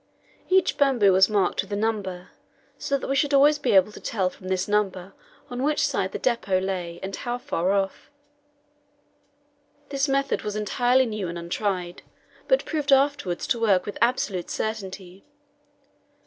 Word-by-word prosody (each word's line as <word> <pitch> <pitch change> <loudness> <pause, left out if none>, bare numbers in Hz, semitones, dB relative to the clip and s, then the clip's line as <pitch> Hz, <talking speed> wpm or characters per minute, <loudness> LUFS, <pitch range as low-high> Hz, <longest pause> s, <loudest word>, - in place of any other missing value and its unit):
Each 375 0 +2
bamboo 245 -9 +4
was 190 +2 +5
marked 200 -4 +1
with 195 - -12
a - - -1
number, 200 -4 -3 0.5
so 280 - 0
that - - -6
we 275 - 0
should 285 +1 +2
always 295 +2 +5
be - - +1
able 195 +2 +5
to - - -11
tell 190 -5 -1
from 185 - -12
this 185 0 -1
number 195 -3 -1 0.3
on 245 0 -5
which 295 +1 +1
side 260 -9 -1
the - - -4
depot 230 -7 0
lay, 180 -3 -4
and 195 0 -4
how 245 0 -3
far 195 -9 -1
off. 195 -1 -2 1.8
This 275 0 0
method 275 0 0
was 210 -1 -4
entirely 245 +5 +2
new 215 -5 -4
and 170 0 -5
untried, 175 +1 -3 0.5
but - - +2
proved 300 -2 -2
afterwards 270 -10 +2
to 235 - 0
work 200 -5 +2
with 205 - -6
absolute 220 -7 0
certainty. 195 -3 -5
210 Hz, 160 wpm, -25 LUFS, 190-265 Hz, 1.8 s, was